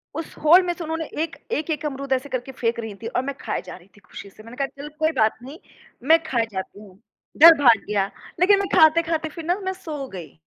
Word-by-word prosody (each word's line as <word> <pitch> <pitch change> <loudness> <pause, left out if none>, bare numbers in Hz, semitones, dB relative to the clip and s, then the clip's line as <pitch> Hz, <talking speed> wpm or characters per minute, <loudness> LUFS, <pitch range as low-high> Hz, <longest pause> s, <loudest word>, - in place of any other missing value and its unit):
उस 325 0 -6
होल 340 +5 +7
में 350 - -1
से 345 - -8
उन्होंने 320 0 -4 0.2
एक 320 -4 -6 0.2
एक-एक 305 0 -2
अमरूद 275 -1 -3
ऐसे 265 +2 -2
करके 255 0 -4
फेंक 235 -3 -2
रही 225 -2 -6
थीं - - -4
और 250 - +1
मैं 280 0 -4
ख़ाए - - -3
जा - - -9
रही 180 0 -17
थी - - -17
खुशी 200 - -10
से। 215 - -17
मैंने 230 +3 -12
कहा 275 - -1
चलो 280 +2 -10
कोई 315 0 +2
बात 220 0 +2
नहीं 280 +6 -10 0.5
मैं 325 0 +6
ख़ाए 245 -8 0
जाती 190 +1 -6
हूँ। 195 -3 -16 0.4
डर 330 +2 +10
भाग 235 -6 +5
गया 200 -2 0 0.3
लेक़िन 395 +3 +5
मैं 395 - -1
ख़ाते-ख़ाते 320 0 +3
फ़िर 320 +1 -9
ना 350 +2 +1
मैं 380 - -1
सो 310 -7 -7
गई। 165 - -10
285 Hz, 240 wpm, -22 LUFS, 230-325 Hz, 0.5 s, डर